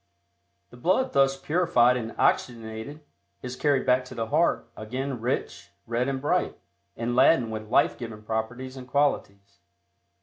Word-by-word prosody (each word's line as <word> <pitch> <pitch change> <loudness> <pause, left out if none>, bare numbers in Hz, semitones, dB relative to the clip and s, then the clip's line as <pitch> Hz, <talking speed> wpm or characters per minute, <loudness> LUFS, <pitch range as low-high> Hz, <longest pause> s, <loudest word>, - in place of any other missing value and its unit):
The 120 - -13
blood 185 - +1
thus 135 0 +3
purified 135 -5 +3
and 115 -2 -4
oxygenated 115 +5 -1 0.4
is 125 0 -5
carried 140 -1 +1
back 125 0 +3
to - - -10
the 115 - -2
heart, 155 -4 +2
again 125 +3 -4
rich, 125 +2 -3 0.2
red 120 +2 -1
and 135 -1 -1
bright, 145 - 0 0.4
and 120 +1 -2
laden 130 -2 +4
with 110 -1 -6
life - - +3
giving 110 -3 -7
properties 120 +4 -4
and 130 -1 -9
qualities. 100 -9 -1
125 Hz, 145 wpm, -26 LUFS, 115-135 Hz, 0.4 s, laden